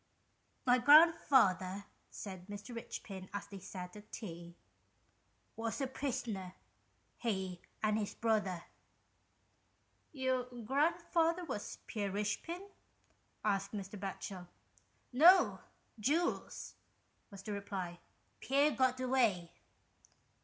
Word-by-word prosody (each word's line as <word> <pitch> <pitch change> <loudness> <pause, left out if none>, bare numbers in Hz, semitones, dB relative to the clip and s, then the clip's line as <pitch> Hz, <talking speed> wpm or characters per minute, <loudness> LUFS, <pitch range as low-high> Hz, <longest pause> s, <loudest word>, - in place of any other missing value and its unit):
" - - -42
My 250 0 +5
grandfather," 245 - +6 0.2
said 185 -3 -8
Mr. 205 +4 -7
Eichpin, 195 -4 -7
as 200 - -3
they 200 -1 -9
sat 180 -1 -8
at 210 0 -13
tea, 170 -5 -7 0.5
" - - -41
was 225 +3 -3
a 275 - +1
prisoner 230 -8 -3 0.3
— - - -41
he 190 -6 -2 0.2
and 215 0 +2
his 205 - -3
brother." 210 -6 0 0.8
" - - -41
Your 255 -1 +2 0.2
grandfather 335 +5 +2
was 255 -9 -5
Pierre 205 -3 -2
Richepin? 215 - -3 0.4
" - - -20
asked 200 -1 0
Mr. 200 0 -5
Batchel. 190 -1 -5 0.4
" - - -40
No! 345 +8 +7 0.4
Jules," 305 +11 0 0.6
was 195 -2 -11
the 210 - -5
reply. 190 -3 -4 0.2
" - - -40
Pierre 280 +3 +3
got 255 -2 +2
away." 235 -10 +2
210 Hz, 115 wpm, -35 LUFS, 190-265 Hz, 0.8 s, No